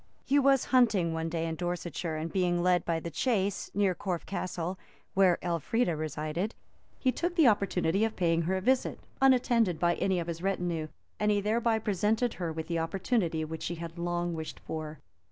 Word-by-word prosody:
He 285 +1 +4
was 275 -1 +4
hunting 210 -10 +4
one 160 0 -2
day 165 0 -2
in 165 - -2
Dorsetshire, 175 -1 -3
and 155 +1 -4
being 175 -2 +1
led 180 -1 +3
by 165 -1 0
the 170 +1 -6
chase 200 - 0
near 200 -2 +3
Corfe 180 -1 -3
Castle, 185 -1 -3 0.3
where 185 -3 +4
Elfrida 175 - 0
resided, 155 - -3 0.4
he 260 - +2
took 345 +6 -2
the 320 -6 +6
opportunity 195 -3 +2
of 225 -1 0
paying 170 -2 +2
her 190 +3 0
visit, 260 +5 +1 0.2
unattended 240 -9 +4
by 175 0 +3
any 190 +1 0
of 170 - -3
his 165 0 -5
retinue, 175 -4 -1 0.3
and 210 - +2
he 205 -1 +3
thereby 225 +2 +1
presented 220 +3 0
her 170 -2 -1
with 160 0 -4
the 170 -1 -1
opportunity 165 -1 0
which 160 +1 -6
she 175 - -3
had 170 0 -7
long 175 0 -1
wished 160 -1 -6
for. 155 -1 -5
180 Hz, 185 wpm, -30 LUFS, 165-210 Hz, 0.4 s, the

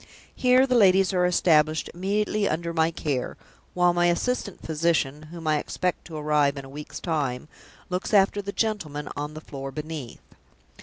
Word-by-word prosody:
Here 255 +1 +4
the 255 - 0
ladies 195 -4 +5
are 180 -1 +3
established 155 -3 +3
immediately 200 +3 0
under 170 +2 -2
my 160 0 +2
care, 145 -6 -3 0.4
while 180 -1 +4
my 175 0 +3
assistant 200 +4 -1
physician 155 -2 0
(whom 170 -1 -9
I 155 -1 +2
expect 180 +4 -3
to 160 -2 -7
arrive 150 -2 +2
in 140 - -6
a - - -12
week's 145 +2 -8
time) 145 -6 -2 0.4
looks 180 +1 -3
after 205 0 +4
the 200 0 -5
gentlemen 170 -11 -2
on 150 +1 -5
the 155 - -7
floor 135 -3 -7
beneath. 150 -3 -7
165 Hz, 165 wpm, -25 LUFS, 150-190 Hz, 0.4 s, ladies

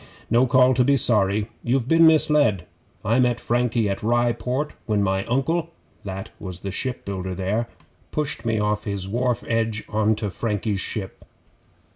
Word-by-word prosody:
'No 120 +3 +4
call 130 +1 +5
to 125 0 +3
be 140 +2 +3
sorry. 105 -3 +2
You've 125 0 0
been 165 +2 +6
misled. 150 - +3 0.4
I 115 +5 +2
met 125 -2 +2
Frankie 120 -2 0
at 100 - -2
Rye 120 +2 +2
Port 125 +5 -3
when 105 -2 +1
my 95 0 0
Uncle, 160 +7 0 0.3
that 95 -1 -6
was 95 -3 -7
the 100 - -4
shipbuilder 95 -5 -4
there, 100 +5 -1 0.4
pushed 150 -6 -3
me 115 -2 0
off 105 0 0
his 100 -3 -3
wharf 120 +3 -1
edge 115 -2 0
on 110 +1 +1
to 105 -2 -3
Frankie's 105 0 -2
ship. 95 -3 -5
115 Hz, 160 wpm, -23 LUFS, 100-125 Hz, 0.4 s, been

